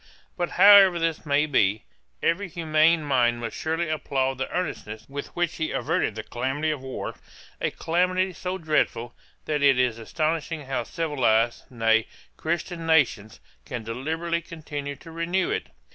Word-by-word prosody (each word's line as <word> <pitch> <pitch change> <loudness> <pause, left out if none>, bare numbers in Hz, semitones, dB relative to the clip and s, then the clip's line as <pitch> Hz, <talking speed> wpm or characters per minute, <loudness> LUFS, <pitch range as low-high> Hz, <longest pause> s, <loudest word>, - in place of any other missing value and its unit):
But 175 -1 -1
however 200 -3 +8
this 165 -2 -2
may 145 +1 +3
be, 110 -8 +2 0.4
every 185 +4 +1
humane 160 0 +3
mind 120 -4 +2
must 115 -1 -5
surely 160 +1 -1
applaud 135 -4 -1
the 135 - -2
earnestness 110 -11 -4
with 140 +1 -6
which 175 -1 -1
he 160 - -1
averted 135 - 0
the 110 - -5
calamity 135 +7 -2
of 150 -3 -4
war; 130 -1 -5 0.5
a - - +1
calamity 185 +2 0
so 185 +2 -4
dreadful, 150 -7 0 0.3
that 150 -2 -1
it 140 -2 +5
is 125 -3 +1
astonishing 155 +4 -2
how 130 -3 -2
civilised, 120 -8 0
nay, 115 -2 +2 0.3
Christian 165 0 -3
nations, 120 -10 +2 0.2
can 120 - -6
deliberately 160 +9 -2
continue 145 -4 -6
to 165 +3 -13
renew 170 +3 -1
it. - - -2
155 Hz, 150 wpm, -25 LUFS, 125-165 Hz, 0.5 s, however